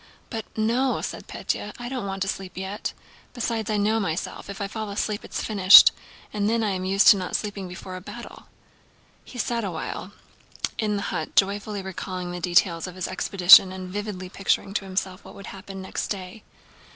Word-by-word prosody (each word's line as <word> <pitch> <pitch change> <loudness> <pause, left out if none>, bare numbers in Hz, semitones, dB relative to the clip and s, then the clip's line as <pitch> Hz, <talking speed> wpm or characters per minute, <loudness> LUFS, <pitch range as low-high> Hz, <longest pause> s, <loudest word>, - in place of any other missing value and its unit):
"But... 225 -3 -4
no," 240 +5 +1
said - - -6
Pétya, 210 - -4
"I 240 - -6
don't 250 -5 -4
want 195 0 -2
to - - -5
sleep 190 -1 -4
yet. 190 +2 -4 0.4
Besides 230 -3 -2
I 215 - +1
know 215 +2 +2
myself, 185 -1 -4
if 200 - -7
I 200 - -2
fall 215 0 -5
asleep 205 +1 -2
it's - - -5
finished. 195 -3 +8 0.4
And 210 0 0
then 230 0 +1
I 210 - 0
am 185 -1 -3
used 195 +1 +3
to 205 - +8
not 185 -1 -4
sleeping 205 -3 -3
before 185 +1 -8
a 185 - -7
battle." - - -10 0.8
He 250 - -12
sat 235 0 -1
awhile 185 +1 -5 0.7
in 210 -2 0
the 200 - -2
hut - - -4
joyfully 200 0 +1
recalling 185 -1 -5
the 175 - -5
details 175 -1 +2
of 180 - -9
his 185 - -3
expedition 185 0 +6
and 185 -1 -7
vividly 205 -3 -4
picturing 195 +1 -1
to 200 - -2
himself 190 -1 -3
what - - -13
would 200 - -10
happen 195 0 -9
next 190 - -4
day. 195 +2 -6
195 Hz, 190 wpm, -25 LUFS, 185-210 Hz, 0.8 s, finished